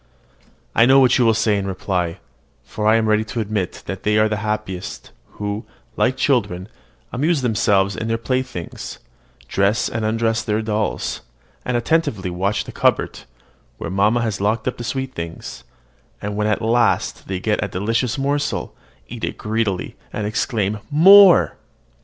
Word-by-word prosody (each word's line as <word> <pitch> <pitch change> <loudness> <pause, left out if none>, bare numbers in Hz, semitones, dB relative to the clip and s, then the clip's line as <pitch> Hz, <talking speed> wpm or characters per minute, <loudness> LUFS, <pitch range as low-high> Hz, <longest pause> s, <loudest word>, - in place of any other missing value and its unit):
I 115 - +5
know 135 +1 +7
what 130 -2 +4
you 125 - +4
will 115 -1 +4
say 105 -2 +2
in 100 - -3
reply; 90 -2 -2 0.5
for 105 0 -3
I 110 - +6
am 115 -1 +2
ready 110 0 +3
to 115 +2 -5
admit 105 -4 -3
that 95 0 -5
they 105 0 +1
are 110 0 +3
happiest, 105 -3 -4 0.2
who, 105 +1 -4 0.3
like 130 +1 +1
children, 105 -9 0 0.4
amuse 145 +2 +1
themselves 100 -4 +2
with 110 - -4
their 115 0 0
playthings, 130 -6 -4 0.5
dress 100 - +1
and 110 0 -3
undress 115 +1 +1
their 110 0 -1
dolls, 110 -1 -2 0.4
and 125 -1 0
attentively 120 - 0
watch 100 +4 -1
the - - -9
cupboard, - - +1 0.6
where - - -5
mamma 105 +5 +2
has 110 -4 -2
locked 110 +3 0
up 125 - -2
her - - -4
sweet 130 +2 -3
things, 85 - -7 0.6
and, 105 0 -4
when 105 0 0
at 105 +1 0
last 115 +1 +1
they 95 -1 -3
get 105 +2 0
a - - -1
delicious 115 +7 -1
morsel, 145 +2 -1 0.3
eat - - -9
it - - -3
greedily, 105 -3 -2
and 105 - -3
exclaim, 105 -1 -1
"More!" 190 +5 +7
110 Hz, 160 wpm, -20 LUFS, 100-120 Hz, 0.6 s, know